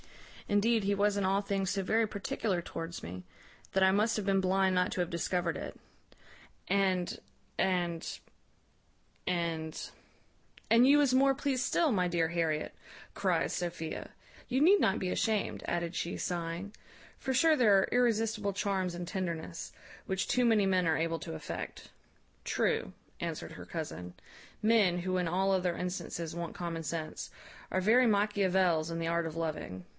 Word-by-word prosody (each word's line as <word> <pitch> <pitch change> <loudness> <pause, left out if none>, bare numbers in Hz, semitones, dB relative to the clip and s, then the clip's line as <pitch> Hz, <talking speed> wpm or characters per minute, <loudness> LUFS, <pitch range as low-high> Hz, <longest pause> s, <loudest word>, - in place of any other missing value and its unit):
Indeed 215 +2 +3
he 200 +1 +1
was 205 +1 +2
in 200 - 0
all 190 +1 +2
things 195 -2 -1
so 200 0 0
very 220 +4 +2
particular 200 -2 -2
towards 165 0 -6
me, 90 +2 -7 0.5
that 190 - +3
I 190 - +6
must 215 +4 +2
have 210 - -2
been 195 -1 +3
blind 190 0 +2
not 180 0 +2
to - - -4
have 175 -1 0
discovered 170 0 -1
it. - - -7 0.9
And, 185 -2 +1 0.4
and, 175 -3 0 1.2
and 165 -3 -2 0.5
" - - -29
"And 230 +2 +7
you 285 +2 +7
was 285 -3 +3
more 270 +1 +5
pleased 270 -2 -1
still, 315 -3 +2
my 180 -3 +1
dear 170 -2 +1
Harriet," 160 -2 -1 0.4
cries - - 0
Sophia; 170 -2 -4 0.4
"you 255 +1 +1
need 375 +8 +6
not 195 - +2
be 185 - -2
ashamed," 215 +2 0
added 170 0 -2
she, 170 - -2
sighing; 175 +3 -3 0.4
"for 265 - -2
sure 315 +5 +5
there 220 -8 +5
are 190 - +3
irresistible 225 -4 +1
charms 190 -2 -1
in 175 0 -4
tenderness, 170 - -4 0.3
which 190 0 -1
too 250 - +2
many 220 -4 +4
men 185 -2 +2
are 160 -1 +2
able 165 0 -1
to - - -6
affect." - - -6 0.5
"True," - - 0 0.3
answered - - -4
her - - -9
cousin; 90 0 -6 0.5
"men, 215 -5 +4
who 185 +1 -1
in 180 -2 0
all 190 +3 +1
other 180 -2 0
instances 170 -2 -4
want 170 -1 -5
common 170 -2 -4
sense, 160 0 -4 0.4
are 185 - +1
very 235 +6 +5
Machiavels 190 -6 +2
in 165 - -3
the 165 - -2
art 170 0 +1
of 160 0 -5
loving. 155 - -4
185 Hz, 165 wpm, -31 LUFS, 170-205 Hz, 1.2 s, And